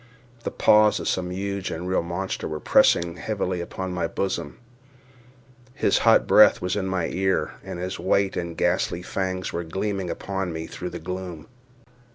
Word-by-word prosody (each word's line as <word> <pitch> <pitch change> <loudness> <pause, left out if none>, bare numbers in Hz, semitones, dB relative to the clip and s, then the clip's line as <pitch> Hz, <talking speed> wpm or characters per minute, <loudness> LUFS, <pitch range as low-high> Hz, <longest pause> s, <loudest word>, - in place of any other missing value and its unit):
The - - 0
paws 105 0 +4
of - - -4
some 90 -1 -1
huge 100 +1 -3
and 90 +3 -5
real 95 - +1
monster 90 +3 -3
were 75 0 -4
pressing 85 +2 +3
heavily 95 -4 -2
upon 95 +2 -5
my 90 -2 -1
bosom—his 125 - -5
hot - - +5
breath - - +7
was 90 +1 -2
in 95 -2 -1
my 95 -3 0
ear—and 95 -1 -2
his 90 +2 -4
white 100 -1 +1
and 85 -2 -4
ghastly 90 0 0
fangs 95 0 -3
were 85 - -2
gleaming 95 +2 -3
upon 95 -1 -3
me 80 0 -5
through 90 +2 -6
the 85 - -6
gloom. 90 -2 -6
95 Hz, 160 wpm, -24 LUFS, 85-100 Hz, -, breath